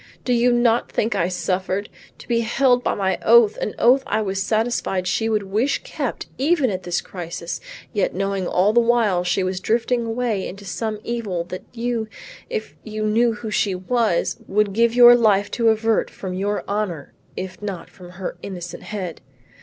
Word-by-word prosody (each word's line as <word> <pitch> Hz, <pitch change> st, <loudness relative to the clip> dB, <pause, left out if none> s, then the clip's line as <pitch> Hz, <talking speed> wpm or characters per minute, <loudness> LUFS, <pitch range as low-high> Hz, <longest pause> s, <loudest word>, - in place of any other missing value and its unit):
Do 250 Hz, -, +2 dB
you 240 Hz, +1 st, +4 dB
not 240 Hz, -1 st, +2 dB
think 225 Hz, +2 st, 0 dB
I 170 Hz, -, +1 dB
suffered? 185 Hz, +2 st, -2 dB, 0.3 s
To -, -, -14 dB
be 235 Hz, -1 st, +2 dB
held 245 Hz, +2 st, +2 dB
by -, -, 0 dB
my 190 Hz, -1 st, 0 dB
oath, 230 Hz, -2 st, +6 dB
an 215 Hz, -, -3 dB
oath 255 Hz, +3 st, +5 dB
I 220 Hz, -, +1 dB
was 195 Hz, -1 st, -2 dB
satisfied 215 Hz, -4 st, 0 dB
she 225 Hz, +4 st, 0 dB
would 215 Hz, -2 st, +1 dB
wish 215 Hz, +8 st, 0 dB
kept -, -, -4 dB
even 285 Hz, -3 st, +2 dB
at 185 Hz, -1 st, -3 dB
this 175 Hz, -1 st, -1 dB
crisis, 170 Hz, -1 st, -6 dB, 0.3 s
yet 200 Hz, -5 st, 0 dB
knowing 195 Hz, -1 st, -1 dB
all 195 Hz, +4 st, +2 dB
the 240 Hz, -, +6 dB
while 230 Hz, -6 st, +2 dB
she 180 Hz, +1 st, +1 dB
was 185 Hz, 0 st, -2 dB
drifting 235 Hz, +3 st, 0 dB
away 225 Hz, -4 st, -1 dB
into 200 Hz, +2 st, -9 dB
some 215 Hz, +3 st, -3 dB
evil 215 Hz, -8 st, -2 dB
that 185 Hz, -, -7 dB
you, 235 Hz, -2 st, -2 dB, 0.4 s
if 460 Hz, -3 st, -4 dB
you 215 Hz, -1 st, -4 dB
knew 230 Hz, +2 st, +3 dB
who 215 Hz, 0 st, -6 dB
she 200 Hz, -2 st, +1 dB
was, 210 Hz, 0 st, 0 dB
would 205 Hz, 0 st, +1 dB
give 230 Hz, +2 st, +2 dB
your 240 Hz, 0 st, +9 dB
life 205 Hz, -4 st, +3 dB
to 230 Hz, -2 st, +2 dB
avert 220 Hz, 0 st, +1 dB
from 185 Hz, -2 st, -6 dB
your 200 Hz, +3 st, -1 dB
honor 200 Hz, -8 st, -3 dB, 0.2 s
if 185 Hz, +1 st, -6 dB
not 200 Hz, -4 st, -5 dB
from 180 Hz, -2 st, -14 dB
her 185 Hz, 0 st, -5 dB
innocent 175 Hz, -3 st, -7 dB
head! 185 Hz, -6 st, -6 dB
215 Hz, 185 wpm, -22 LUFS, 190-235 Hz, 0.4 s, your